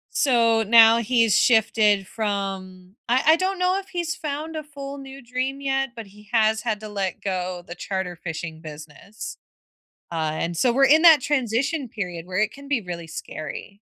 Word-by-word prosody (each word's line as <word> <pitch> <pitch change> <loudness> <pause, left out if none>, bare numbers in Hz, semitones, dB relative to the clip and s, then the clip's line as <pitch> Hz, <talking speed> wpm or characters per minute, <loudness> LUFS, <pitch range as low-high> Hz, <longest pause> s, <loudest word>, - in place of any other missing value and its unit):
so 230 -4 +3
now 225 +1 +7
he's 230 -2 +2
shifted 215 -4 +3
from 195 -3 -4
I 250 +2 +3
I 320 - +7
don't 375 +1 -1
know 365 +1 +2
if 390 - -8
he's 345 -3 -3
found 310 +1 -5
a 310 - -4
full 280 -1 -8
new 270 0 -10
dream 260 +3 -3
yet, 270 -1 0
but 220 -3 -8
he 210 +1 -18
has 220 -1 +3
had 220 -3 -2
to 215 - -8
let 195 -2 -4
go 180 -2 -3
the 175 - -8
charter 190 -2 -4
fishing 165 -1 -7
business, 155 +6 -10 0.7
uh, 160 -2 -1
and 170 +2 -3
so 245 - +3
we're 275 +3 +4
in 305 +4 +6
that 320 -5 +8
transition 270 +2 -1
period 180 -7 -6
where 185 0 -6
it 215 0 +1
can 280 0 -13
be 270 -6 0
really 170 -2 -7
scary. 160 +4 -8
225 Hz, 180 wpm, -23 LUFS, 185-275 Hz, 0.7 s, that